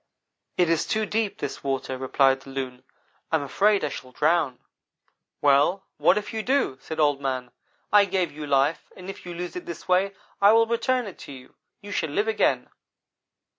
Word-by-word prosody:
"'It 180 - +4
is 165 -1 +1
too 220 0 0
deep, 215 -1 -1
this 135 - -5
water,' 135 -1 -2
replied 135 +1 +2
the 135 - -13
Loon, 130 -2 -5 0.5
'I - - +3
am 155 - 0
afraid 200 +8 +2
I 150 - 0
shall 130 -2 -8
drown.' 150 -2 +1 0.8
"'Well, 145 +7 +4
what - - +4
if 210 +1 -4
you 220 - -1
do?' 250 - 0
said 160 0 -6
Old 145 -2 +3
man. 130 -2 -3 0.4
'I 205 -1 +7
gave 185 -3 0
you 150 0 -7
life, 140 +3 +1
and 185 +1 -6
if 190 - -13
you 175 - -6
lose 175 0 -5
it 180 - -6
this 170 - -7
way 190 +2 +2 0.3
I 200 +2 +7
will 230 0 +5
return 245 +2 0
it 195 - -9
to - - -10
you. 130 -2 -12 0.3
You 205 0 -9
shall 160 -5 -1
live 205 +9 0
again!' 220 - +1
165 Hz, 195 wpm, -25 LUFS, 135-200 Hz, 0.8 s, I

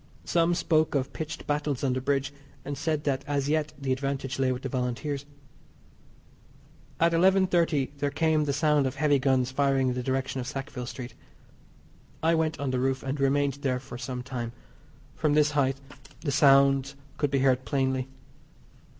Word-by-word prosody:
Some 170 0 +2
spoke 160 -3 +1
of 135 -1 -1
pitched 160 0 -6
battles 145 -2 -1
on 130 -2 +2
the 130 - -2
bridge, 140 +1 0 0.3
and 145 +1 -3
said 150 +1 -1
that 135 -2 -1
as 140 -1 -1
yet 155 0 +1
the 135 -1 -2
advantage 135 0 -2
lay 130 -1 +2
with 125 +1 -4
the - - -2
Volunteers. 135 +3 -3 1.7
At 170 +1 +4
11.30 175 -5 +3
there 145 0 +1
came 155 0 +1
the 145 - 0
sound 150 -1 +2
of 130 - -4
heavy 145 -1 +3
guns 130 -1 +2
firing 135 -1 +2
in - - 0
the 125 - -3
direction 130 +1 -2
of 125 - -6
Sackville 135 -3 -5
Street. 125 0 -7 1.1
I 165 +1 +4
went 160 -1 0
on 140 -2 -1
the 130 - 0
roof, 130 +1 0
and 135 +2 -3
remained 140 0 +1
there 130 -2 0
for 130 -2 -9
some 125 -1 -5
time. 120 -2 -5 0.6
From 150 -1 +1
this 150 0 +4
height 135 -2 +1 0.4
the 145 - -1
sounds 135 0 +4 0.2
could 145 - +1
be 140 - +1
heard 130 -1 +3
plainly. 130 -1 0
140 Hz, 175 wpm, -27 LUFS, 130-150 Hz, 1.7 s, At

